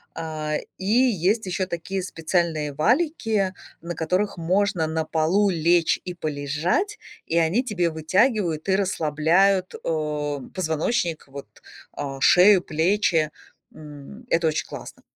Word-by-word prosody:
А, 155 -2 -3 0.2
и 190 - -7
есть 215 -2 +2
еще 185 0 -2
такие 185 +2 -4
специальные 165 -3 -1
валики, 220 - +1 0.3
на 170 +1 -6
которых 185 +6 -1
можно 180 0 +1
на 160 0 -1
полу 165 +6 +1
лечь 170 -1 +2
и 180 - -4
полежать, 155 - -2 0.3
и 165 - 0
они 170 +8 +2
тебе 190 -9 -1
вытягивают 175 - 0
и 190 - +3
расслабляют, 185 +2 +1
э, 150 -2 -2 0.2
позвоночник 160 0 -1
вот, 140 0 -9 0.4
а, 135 -1 -6
шею, 185 +4 +6
плечи. 165 -1 +1 0.4
М, 150 - -12
это 165 0 +2
очень 155 - -1
классно. - - -10
170 Hz, 125 wpm, -24 LUFS, 155-195 Hz, 0.4 s, шею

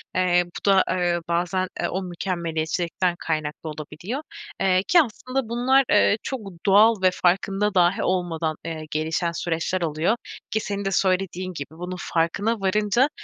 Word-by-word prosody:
Eee, 180 -1 +3
bu 175 - -10
da, 190 -1 +5
eee, 175 -1 +1
bazen, 175 +2 0
eee, - - 0
o 190 +1 -2
mükemmeliyetçilikten 175 0 -2
kaynaklı 155 0 -3
olabiliyor. 155 - -6 0.4
Eee, 185 -1 +3
ki 350 - +6
aslında 255 -1 -3
bunlar, 255 +3 +3
eee, 205 - +5
çok 265 - -3 0.3
doğal 210 +2 +5
ve 185 - +5
farkında 195 +3 +1
dâhi 180 +1 +3
olmadan, 165 -4 -1
eee, 160 -1 -4
gelişen 160 +2 -1
süreçler 170 +2 -2
oluyor. 160 +6 +1 0.4
Ki 220 - +1
senin 200 -1 -4
de 195 - 0
söylediğin 185 -1 0
gibi 140 -4 -6
bunun 180 +3 -6
farkına 200 +7 0
varınca, 210 +7 +2
185 Hz, 150 wpm, -24 LUFS, 170-200 Hz, 0.4 s, ki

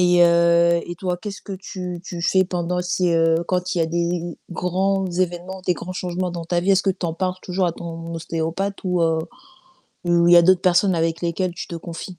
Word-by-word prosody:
et 180 0 +4
heu 170 0 +4
et 175 - -5
toi, 180 0 -2
qu'est-ce 200 +2 -7
que 195 - -6
tu 180 -2 -6
tu 175 -2 -6
fais 190 +2 +3
pendant 180 0 -2
si, 180 0 0
heu, 165 0 +3
quand 180 0 -1
il 175 - -1
y - - +2
a 165 - +2
des 170 0 -2
grands 190 +2 0
évènements, 180 +1 -2
des 180 - +3
grands 180 +2 -7
changements 180 0 -3
dans 170 -1 -5
ta 175 +1 0
vie, 185 +3 +1
est-ce 195 0 +3
que 195 - +3
tu 185 - -5
en 165 -1 -1
parles 185 +1 -1
toujours 185 0 0
à 170 - 0
ton 165 0 -7
ostéopathe 165 +4 -3
ou 180 -2 +1
heu, 165 -1 +2 0.9
ou 170 -1 +3
il 175 - +6
y - - +9
a 170 - +8
d'autres 185 +1 +5
personnes 185 +1 +3
avec 165 0 0
lesquelles 175 +1 -1
tu - - -7
te 170 - -5
confies? 170 +2 -8
175 Hz, 230 wpm, -22 LUFS, 170-185 Hz, 0.9 s, y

